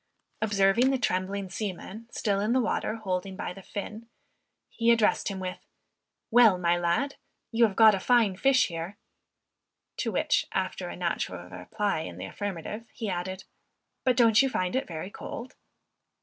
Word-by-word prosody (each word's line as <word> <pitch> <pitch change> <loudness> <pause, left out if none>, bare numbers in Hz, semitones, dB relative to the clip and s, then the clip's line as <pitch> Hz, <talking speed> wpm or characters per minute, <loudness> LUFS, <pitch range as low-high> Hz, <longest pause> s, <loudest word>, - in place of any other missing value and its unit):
Observing 210 +3 +3
the 270 - +2
trembling 195 -3 -1
seaman 205 +3 -6
still 205 -4 0
in 215 +4 +1
the 260 - +3
water 220 -2 -1
holding 190 -3 -3
by 180 - -4
the 195 - -11
fin, 215 +4 -7 0.6
he 230 0 0
addressed 230 -2 +3
him 195 -3 -3
with, 185 -1 -4 0.7
"Well 225 -5 +7
my 175 -1 +2
lad, 175 +12 0 0.3
you 230 0 +5
have 195 - -7
got 220 -1 +8
a 195 - 0
fine 225 -3 +3
fish 270 +5 +4
here," 170 +3 -6 1.0
to - - -1
which - - +1
after - - -2
a - - -6
natural - - -3
reply 210 -6 -2
in 90 - -6
the 90 - -5
affirmative, 205 - -5
he 220 -4 -4
added, 185 +1 -4 0.6
"but 255 -2 +2
don't 230 -1 +6
you 270 - +2
find 185 -4 -1
it 265 - 0
very 170 +3 -6
cold?" 240 +4 -7
205 Hz, 165 wpm, -28 LUFS, 185-230 Hz, 1.0 s, got